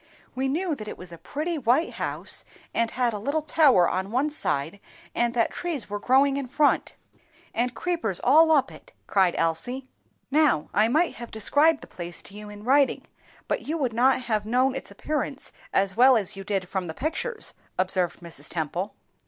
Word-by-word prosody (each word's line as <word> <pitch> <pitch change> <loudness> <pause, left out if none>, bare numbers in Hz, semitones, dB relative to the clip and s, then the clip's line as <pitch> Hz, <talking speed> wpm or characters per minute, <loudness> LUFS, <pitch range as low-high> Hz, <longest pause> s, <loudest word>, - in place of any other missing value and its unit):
"We 265 +1 -1
knew 330 +5 0
that 215 -7 -6
it - - -6
was 180 -1 -9
a 170 - -10
pretty 315 +2 -3
white 260 +6 +2
house, - - -3 0.3
and 230 0 +1
had 245 -1 0
a 210 - -3
little 285 +8 -1
tower 280 - +5
on 190 +1 -2
one 265 +7 0
side, 160 - -1 0.3
and 240 0 0
that 230 - +2
trees 315 - -3
were 205 - -2
growing 270 +4 +3
in 275 -2 -3
front, 290 +3 +1 0.6
and 245 +2 -1
creepers 330 - -1
all 320 +2 +6
up 290 -4 +3
it!" - - -15
cried 190 -3 +2
Elsie. 245 +12 -1 0.4
"Now, 295 - +2
I 215 +2 +4
might 320 +9 +1
have 235 - -8
described 290 +8 +3
the - - -11
place 175 -1 -6
to - - -11
you 210 0 -9
in 205 0 -10
writing, 275 +3 +3 0.4
but - - -2
you 320 +3 -1
would 260 -7 -1
not 255 +2 +3
have 215 -3 0
known 250 +4 +2
its - - -5
appearance 290 -2 -3 0.2
as 195 -1 +1
well 255 +2 +7
as 200 -4 -1
you 195 - -7
did 195 -2 -2
from 185 -1 -3
the 160 - -6
pictures," 375 - -2 0.2
observed 185 -2 0
Mrs. 165 -4 -8
Temple. 170 +5 -3
240 Hz, 190 wpm, -26 LUFS, 195-285 Hz, 0.6 s, well